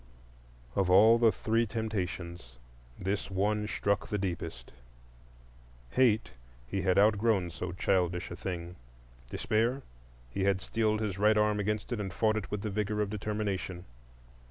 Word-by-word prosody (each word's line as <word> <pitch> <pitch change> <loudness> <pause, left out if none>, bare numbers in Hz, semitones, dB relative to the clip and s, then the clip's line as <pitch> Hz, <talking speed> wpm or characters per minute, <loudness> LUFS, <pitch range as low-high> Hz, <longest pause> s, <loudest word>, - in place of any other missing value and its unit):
Of 95 -2 +2
all 110 +5 +7
the 115 -2 +5
three 115 +2 0
temptations, 90 - -4 0.4
this 95 +2 -2
one 105 +2 0
struck 100 -1 0
the 105 - -1
deepest. 85 -9 -4 1.2
Hate? 110 - +3 0.3
He 95 +11 -2
had 95 -1 +2
outgrown 105 -3 +3
so 90 +2 -5
childish 90 -1 0
a - - -4
thing. 90 -1 -5 0.5
Despair? 115 - 0 0.5
He 95 - -2
had 100 -1 +2
steeled 110 +1 0
his 100 -3 -2
right 105 +1 +4
arm 105 0 +2
against 105 +3 -2
it, 115 - -3
and 100 -2 -3
fought 110 +3 +1
it 105 - -4
with 105 -1 -3
the 105 - -2
vigor 105 +1 -1
of 105 -1 0
determination. 100 -4 -3
100 Hz, 145 wpm, -30 LUFS, 90-110 Hz, 1.2 s, all